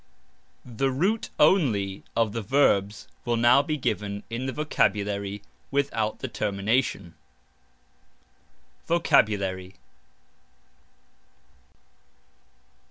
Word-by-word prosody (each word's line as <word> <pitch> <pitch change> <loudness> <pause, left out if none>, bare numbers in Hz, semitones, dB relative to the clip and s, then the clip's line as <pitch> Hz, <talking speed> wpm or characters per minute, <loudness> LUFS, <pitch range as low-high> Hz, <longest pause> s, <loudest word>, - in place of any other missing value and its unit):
(The 125 +3 -1
root 185 - 0
only 115 - +2
of 115 -2 +2
the 115 - -3
verbs 105 -5 +1 0.2
will 120 -1 0
now 120 +3 +5
be 150 +2 -3
given 105 -6 -3
in 120 +3 -3
the - - -1
Vocabulary 100 -8 -1 0.3
without 125 -6 -1
the - - -3
termination). 100 -2 -1 1.7
VOCABULARY. 100 - +1
115 Hz, 80 wpm, -26 LUFS, 100-135 Hz, 1.7 s, now